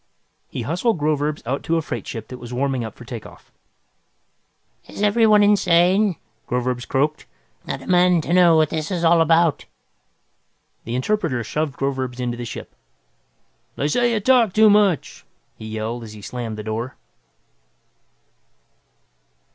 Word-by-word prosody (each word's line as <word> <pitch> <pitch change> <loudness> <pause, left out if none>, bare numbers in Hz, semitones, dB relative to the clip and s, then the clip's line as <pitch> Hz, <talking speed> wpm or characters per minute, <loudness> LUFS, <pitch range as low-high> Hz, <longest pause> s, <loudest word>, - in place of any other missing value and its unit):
He - - -5
hustled 180 +7 0
Groverzb 150 -1 -1
out 135 +4 -2
to 165 - 0
a - - 0
freight 120 -8 -5
ship 110 -2 -7
that 125 - -8
was 120 -1 -9
warming 130 0 -1
up 110 -2 -7
for 120 - -13
takeoff. 115 -2 -10 1.4
"Is - - -6
everyone 210 0 +4
insane?" 195 -1 +3 0.3
Groverzb 125 0 -2
croaked. 145 +3 -1 0.4
"I - - -3
demand 180 -2 +2
to 170 - -2
know 175 -2 +6
what 155 -1 +2
this 155 -1 -3
is 180 -3 -2
all 165 0 +5
about!" 165 -1 +2 1.2
The 115 - -4
interpreter 140 - -1
shoved 150 +3 -3
Groverzb 130 -2 -3
into 120 -1 -2
the 120 - -5
ship. - - -8 1.0
"They 140 - -1
say 240 +9 +2
you 220 - +1
talk 235 -3 +3
too 215 -1 +6
much!" 200 -6 +1 0.3
he 110 - -10
yelled, 110 +2 -4
as 110 -1 -10
he 105 -1 -12
slammed 115 -2 -5
the 105 - -6
door. 115 +4 -4
150 Hz, 145 wpm, -21 LUFS, 125-180 Hz, 1.4 s, know